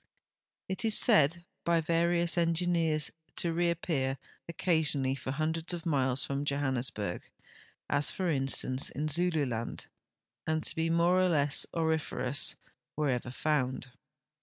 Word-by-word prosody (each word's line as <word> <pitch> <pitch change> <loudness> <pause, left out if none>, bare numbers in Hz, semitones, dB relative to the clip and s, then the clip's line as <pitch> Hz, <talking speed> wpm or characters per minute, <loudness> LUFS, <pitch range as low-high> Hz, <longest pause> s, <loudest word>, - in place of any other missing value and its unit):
It 190 +4 -1
is 220 -2 +2
said 170 - +3 0.2
by 170 -1 +2
various 170 +1 +1
engineers 165 -2 +1 0.2
to 170 -1 0
reai)pcar 165 -6 -1 0.3
occasional!}' 160 -6 +1
for 130 0 -7
hundreds 160 +5 -2
of 170 0 -9
miles 130 -5 +1
from 140 +1 -3
Johannes 135 -3 0
burg— 100 -4 -6 0.6
as, 140 +1 +4
for 185 - -3
instance, 135 -1 +1
in 150 +2 -3
Zululand 150 -8 -1 0.3
— 115 0 -32
and 160 0 0
to - - -2
be 165 0 -1
more 170 +2 +3
or 185 0 +3
le.ss 145 -4 +3
aurif 160 -2 -1
erous 130 +3 +2 0.4
wherever 135 -5 -1
found. 130 -1 -2
155 Hz, 135 wpm, -30 LUFS, 135-170 Hz, 0.6 s, as